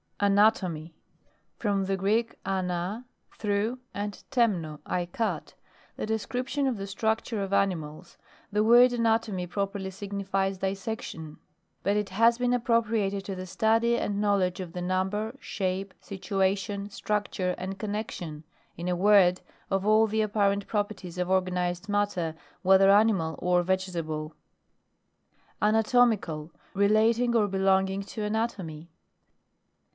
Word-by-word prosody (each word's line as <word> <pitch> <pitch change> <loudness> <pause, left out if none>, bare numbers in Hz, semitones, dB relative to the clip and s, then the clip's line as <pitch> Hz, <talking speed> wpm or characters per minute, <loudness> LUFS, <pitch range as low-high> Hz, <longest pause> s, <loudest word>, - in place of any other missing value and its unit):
ANATOMY. 195 -6 +2 0.6
From 200 -3 0
the 195 0 0
Greek, 215 +5 0
ana, 185 +4 -2 0.3
through, 215 +4 -1
and 205 0 -5
temno, 185 - +1
I 175 -1 -1
cut; 225 +6 -3 0.4
the - - -3
des 220 0 0
cription 270 +3 -1
of 250 -4 -1
the 195 - -4
structure 220 +2 -1
of 195 0 -3
ani 195 -1 +3
mals. 155 +2 -10 0.3
The 210 +1 +2
word 240 +2 +7
anatomy 225 -5 +1
properly 195 +1 -3
signifies 195 0 -2
dissection; 190 -5 -4 0.5
but 200 +2 +2
it 210 -1 -1
has 230 +5 +4
been 245 0 +2
appropriated 225 -4 +1
to 195 - -4
the 185 0 -6
study 225 +5 +2
and 205 -1 -1
know 205 -1 +3
ledge 180 -1 0
of 180 -3 -6
the 180 - -4
number, 190 +5 -1
shape, 190 -2 -3
situa 195 -1 0
tion, 200 0 -5
structure, 200 -3 -1
and 190 +1 -5
connexion, 205 -7 -5 0.3
in 170 - -4
a 180 - +1
word, 185 -1 +5 0.3
of 195 0 0
all 215 +1 +5
the 220 +1 0
apparent 200 -1 +1
proper 205 -1 -1
ties 180 -2 -10
of 180 0 -1
organised 180 0 0
matter, 205 -6 0 0.3
whether 190 +1 +6
animal 200 -6 +3
or 180 0 +2
vegetable. 170 -4 -2 1.3
ANATOMICAL. 215 -8 +2 0.2
Relating 220 +4 +3
or 215 -3 +4
belonging 190 0 +2
to 205 +2 -6
anatomy. 195 -7 -3
200 Hz, 135 wpm, -28 LUFS, 185-215 Hz, 1.3 s, word